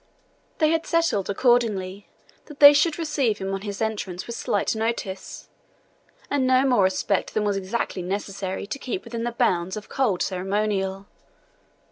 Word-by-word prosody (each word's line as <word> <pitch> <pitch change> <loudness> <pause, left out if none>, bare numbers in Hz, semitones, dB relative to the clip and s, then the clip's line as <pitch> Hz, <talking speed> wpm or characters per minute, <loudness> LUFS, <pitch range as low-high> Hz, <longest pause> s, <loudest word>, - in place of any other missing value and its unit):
They 310 -1 +3
had 330 0 0
settled, 330 - +1
accordingly, 205 -4 +1 0.4
that 295 -2 -13
they 285 0 +11
should 305 +2 +2
receive 290 -9 0
him 195 -1 -4
on 195 - -3
his 205 +1 -4
entrance 205 -5 -3
with 235 - -6
slight 205 0 -1
notice, 220 -4 -4 0.8
and 275 -2 +1
no 260 +1 +4
more 245 -8 +4
respect 190 +1 -1
than 215 - +1
was 205 -1 0
exactly 195 0 -3
necessary 195 +1 -4
to 215 +7 -6
keep 245 -9 -4
within 230 0 -5
the 240 - -1
bounds 190 -6 0
of 210 - -9
cold 220 -10 +1
ceremonial. 195 0 -1
210 Hz, 155 wpm, -24 LUFS, 195-250 Hz, 0.8 s, they